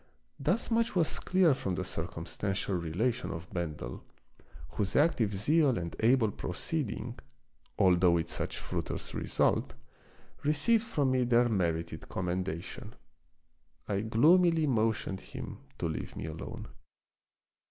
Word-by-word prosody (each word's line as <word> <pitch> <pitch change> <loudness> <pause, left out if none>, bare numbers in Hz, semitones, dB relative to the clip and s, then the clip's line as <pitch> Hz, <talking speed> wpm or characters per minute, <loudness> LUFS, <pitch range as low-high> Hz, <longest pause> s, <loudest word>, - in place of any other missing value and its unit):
Thus 185 - 0
much 230 -1 +2
was 170 -3 +1
clear 185 -4 +4
from 95 -8 -2
the - - -2
circumstantial 95 +4 -3
relation 95 +9 -1
of 80 +2 -6
Bendel, 75 -8 -4 0.7
whose 100 +3 -2
active 145 -9 +3
zeal 135 +6 +3
and 85 -1 -4
able 115 -1 +4
proceeding, 120 - -3 0.6
although 90 -1 +5
with 85 -1 +1
such - - -3
fruitless - - -4
result, 65 - +1 0.7
received 155 +11 +3
from 145 - +1
me 130 -1 +3
their 120 0 +4
merited 85 -6 -1
commendation. 90 -1 -3 0.9
I 100 -1 0
gloomily 160 - +4
motioned 110 -6 0
him - - -8 0.2
to - - -3
leave 80 - -5
me - - -5
alone. 80 0 -7
110 Hz, 120 wpm, -31 LUFS, 90-145 Hz, 0.9 s, although